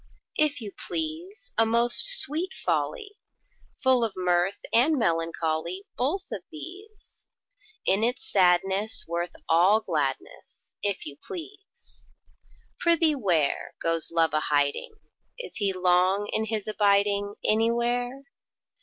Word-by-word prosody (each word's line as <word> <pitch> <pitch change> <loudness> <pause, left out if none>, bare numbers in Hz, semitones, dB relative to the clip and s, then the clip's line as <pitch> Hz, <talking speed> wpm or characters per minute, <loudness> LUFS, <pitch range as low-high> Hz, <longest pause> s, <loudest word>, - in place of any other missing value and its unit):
If 300 -4 +2
you 210 -3 -6
please, 340 - -5
A 225 - +6
most 235 - +2
sweet 365 - +2
folly! 420 -4 -2 0.6
Full 260 -2 +4
of 220 -3 0
mirth 180 +1 +1
and 285 +7 +4
melancholy: 165 -1 -1
Both 320 +10 -2
of - - -4
these! 380 +7 -12 0.6
In 200 +3 +2
its 245 +2 0
sadness 190 +3 +2
worth 170 +1 -3
all 180 +6 +5
gladness, 150 -10 -4
If 200 -2 -2
you 145 -1 -7
please! 395 +3 -11 0.7
Prithee 335 -2 +3
where, 175 - 0
Goes 165 -1 -1
Love 165 -2 +1
a 155 - +3
hiding? 145 - 0 0.4
Is - - -7
he 200 -2 +1
long 185 +2 +2
in 220 - +1
his 215 -2 -3
abiding 205 -1 +2
Anywhere? 240 +4 +1
215 Hz, 120 wpm, -26 LUFS, -, 0.7 s, A